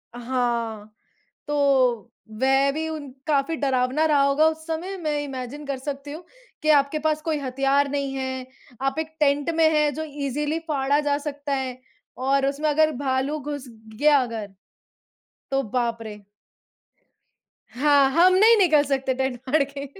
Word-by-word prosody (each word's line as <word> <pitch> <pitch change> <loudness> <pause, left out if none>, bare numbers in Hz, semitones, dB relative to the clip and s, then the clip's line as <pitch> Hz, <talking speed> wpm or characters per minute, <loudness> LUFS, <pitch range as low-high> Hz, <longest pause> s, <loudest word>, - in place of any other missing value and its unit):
हाँ, 235 -4 -2 0.5
तो 260 -6 +2 0.3
वह 270 +1 +3
भी 320 +2 -3
उन 305 -3 -6 0.2
काफ़ी 295 +1 +1
डरावना 265 +1 +1
रहा 295 -2 +3
होगा 280 +3 +3
उस 320 0 -5
समय, 340 +4 -4
मैं 305 -5 -2
इमैजिन 270 +1 -6
कर 275 -1 -3
सकती 280 +1 -6
हूँ 325 +4 -9 0.4
कि 310 - -1
आपके 285 0 +3
पास 310 0 0
कोई 315 -1 -1
हथियार 275 +1 +1
नहीं 280 -1 -2
है, 260 -1 -4 0.4
आप 270 +2 -1
एक 320 0 -4
टेंट 290 +1 +2
में 320 -1 +4
हैं, 300 -1 +2
जो 315 - -4
ईज़िली 295 +2 -2
फाड़ा 285 0 +1
जा 290 -1 0
सकता 290 -1 -5
है 260 -2 -3 0.5
और 275 0 +2
उसमें 290 +2 0
अगर 310 +1 +3
भालू 270 +2 -1
घुस 285 -2 -6 0.3
गया 290 +5 +4
अगर, 225 -4 -5 1.0
तो 270 0 +1
बाप 235 0 -2
रे! 215 -2 -8 1.5
हाँ, 280 +1 +3
हम 350 +5 +5
नहीं 440 +4 +6
निकल 315 -7 +4
सकते 270 -2 -1
टेंट 265 -1 -2
फाड़ 300 +1 +4
के। 280 0 -7
280 Hz, 155 wpm, -24 LUFS, 265-300 Hz, 1.5 s, नहीं